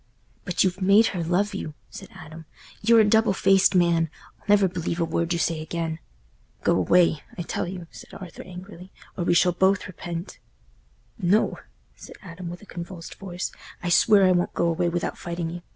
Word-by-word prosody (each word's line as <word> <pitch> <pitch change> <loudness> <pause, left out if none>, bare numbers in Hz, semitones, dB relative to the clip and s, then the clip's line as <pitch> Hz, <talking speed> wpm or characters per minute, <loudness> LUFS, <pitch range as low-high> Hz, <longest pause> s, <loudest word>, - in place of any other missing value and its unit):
"But 180 - +1
you've 190 0 -1
made 200 +4 +6
her 175 -3 -2
love 190 +5 0
you," 155 -6 -5 0.2
said - - -10
Adam. 160 +1 -11 0.4
"You're 230 +1 +6
a 210 - +3
double 220 -1 +4
faced 195 0 +4
man—I'll 170 -3 0
never 205 -1 +5
believe 175 -1 -3
a 170 - +2
word 165 +1 -1
you 170 - +1
say 165 -1 -1
again." 160 0 -4 0.6
"Go - - +3
away, 160 - +3 0.2
I 175 - -3
tell 165 - -3
you," 180 -1 -7
said - - -13
Arthur, 180 -3 -9
angrily, 185 0 -11 0.2
"or 175 - -3
we 175 - +3
shall 180 +1 +4
both 190 +2 +2
repent." 175 -2 -7 0.8
"No," 195 +3 +2 0.4
said - - -12
Adam, 175 -1 -8
with 175 +3 -9
a - - -12
convulsed 175 -2 -8
voice, 180 -2 -5 0.3
"I 175 - -1
swear 195 +3 +5
I 185 - +5
won't 175 -1 0
go - - +1
away 170 +1 +1
without 175 0 -3
fighting 170 -1 -4
you. 175 +1 -7
175 Hz, 185 wpm, -25 LUFS, 170-190 Hz, 0.8 s, made